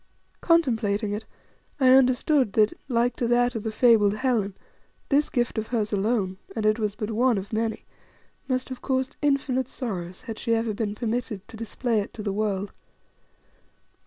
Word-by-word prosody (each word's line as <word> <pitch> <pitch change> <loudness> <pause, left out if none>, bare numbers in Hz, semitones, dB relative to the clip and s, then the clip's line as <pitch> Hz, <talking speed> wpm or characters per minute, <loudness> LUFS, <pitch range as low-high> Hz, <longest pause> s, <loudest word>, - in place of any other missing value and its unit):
Contemplating 225 - +2
it, 210 +2 -4 0.5
I 260 -2 +5
understood 255 -2 +4
indeed 215 -1 +6
that, - - -14
like 240 -1 +1
to 240 - 0
that 245 +1 +3
of 225 - -3
the 220 - -3
fabled 215 -3 +4
Helen, 215 -5 0 0.5
this 290 +1 +3
gift 240 -3 0
of 220 - -4
hers 220 -3 -1
alone 195 -2 0 0.2
and 220 -2 -2
it 215 +1 +3
was 210 -2 -1
but 215 0 -4
one 240 +1 +2
of 195 +3 -6
many 220 0 -2 0.6
must 255 -1 -1
have 255 -1 -7
caused 260 -1 -1
infinite 275 -3 +1
sorrows, 185 -8 -5
had 225 -4 -6
she 230 - +1
ever 225 -1 -1
been 205 0 -3
permitted 220 -3 -3
to - - -10
display 230 +1 -1
it 205 - -5
to 215 - -6
the 200 -2 -1
world. 200 -1 -2
225 Hz, 175 wpm, -25 LUFS, 210-250 Hz, 0.6 s, indeed